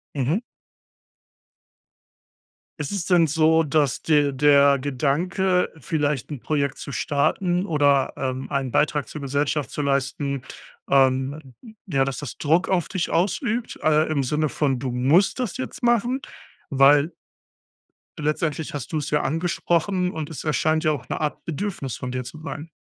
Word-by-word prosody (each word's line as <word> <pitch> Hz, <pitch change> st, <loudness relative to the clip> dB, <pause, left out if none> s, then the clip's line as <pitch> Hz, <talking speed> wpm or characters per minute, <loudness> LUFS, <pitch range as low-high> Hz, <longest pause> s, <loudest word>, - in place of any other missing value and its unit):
Mhm. 145 Hz, -, 0 dB, 2.4 s
Ist 150 Hz, -, -3 dB
es 195 Hz, -4 st, -2 dB
denn 175 Hz, -3 st, +4 dB
so, 160 Hz, +1 st, +3 dB
dass 145 Hz, -3 st, +1 dB
dir 145 Hz, -3 st, +3 dB
der 140 Hz, 0 st, +5 dB
Gedanke, 165 Hz, +8 st, 0 dB
vielleicht 145 Hz, 0 st, -1 dB
'n 145 Hz, -, -5 dB
Projekt 140 Hz, 0 st, -1 dB
zu 140 Hz, -, -7 dB
starten 175 Hz, +7 st, 0 dB
oder, 145 Hz, -5 st, +2 dB
ähm, 130 Hz, -1 st, -3 dB
einen 135 Hz, -2 st, -1 dB
Beitrag 150 Hz, 0 st, +1 dB
zur 150 Hz, -, -7 dB
Gesellschaft 140 Hz, +1 st, -1 dB
zu 150 Hz, -, -3 dB
leisten, 140 Hz, 0 st, -1 dB, 0.5 s
ähm, 135 Hz, 0 st, +1 dB, 0.3 s
ja, 135 Hz, -7 st, +1 dB
dass 135 Hz, -1 st, -4 dB
das 145 Hz, -, -7 dB
Druck 165 Hz, +5 st, +2 dB
auf 180 Hz, -3 st, +1 dB
dich 185 Hz, -3 st, -2 dB
ausübt, 220 Hz, -, -1 dB
äh, 155 Hz, 0 st, +4 dB
im 150 Hz, -3 st, 0 dB
Sinne 150 Hz, +4 st, 0 dB
von, 135 Hz, -3 st, 0 dB
du 125 Hz, -1 st, -3 dB
musst 150 Hz, -, +3 dB
das 245 Hz, -2 st, -2 dB
jetzt 260 Hz, 0 st, -6 dB
machen? 240 Hz, +2 st, +2 dB, 0.5 s
Weil 140 Hz, +3 st, +5 dB, 1.1 s
letztendlich 150 Hz, +1 st, -1 dB
hast 140 Hz, 0 st, -6 dB
du 155 Hz, -, 0 dB
es 150 Hz, 0 st, -4 dB
ja 150 Hz, -, +2 dB
angesprochen 175 Hz, +3 st, 0 dB
und 160 Hz, -2 st, -5 dB
es 155 Hz, -, -7 dB
erscheint 155 Hz, +1 st, +1 dB
ja 155 Hz, -, +3 dB
auch 145 Hz, -, -6 dB
'ne -, -, -3 dB
Art 150 Hz, -1 st, -3 dB
Bedürfnis 165 Hz, -, -4 dB
von 125 Hz, -2 st, -5 dB
dir 125 Hz, -1 st, -3 dB
zu 140 Hz, +5 st, -9 dB
sein. 150 Hz, +2 st, -7 dB
150 Hz, 150 wpm, -23 LUFS, 140-165 Hz, 2.4 s, der